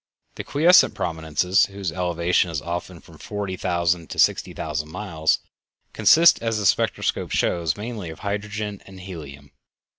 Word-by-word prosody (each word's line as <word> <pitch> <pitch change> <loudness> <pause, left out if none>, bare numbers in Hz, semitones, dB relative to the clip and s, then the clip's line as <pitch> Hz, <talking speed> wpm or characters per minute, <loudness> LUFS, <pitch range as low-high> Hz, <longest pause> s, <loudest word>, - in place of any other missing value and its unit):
The - - -7
quiescent 170 +5 +4
prominences, 80 +5 +1
whose 100 -3 -5
elevation 90 +1 0
is 80 -3 -3
often 85 +2 -6
from 80 -2 -17
forty 100 -3 -4
thousand 85 -2 -1
to - - -7
sixty - - +2
thousand 75 0 -4
miles, 80 -4 -1 0.5
consist, 170 +1 +5
as 115 -1 -1
the 105 - -2
spectroscope - - +1
shows, 85 -4 0
mainly 105 -4 -6
of 80 - -10
hydrogen 105 0 -4
and 95 -1 -12
helium. 75 -7 -10
90 Hz, 145 wpm, -23 LUFS, 80-105 Hz, 0.5 s, consist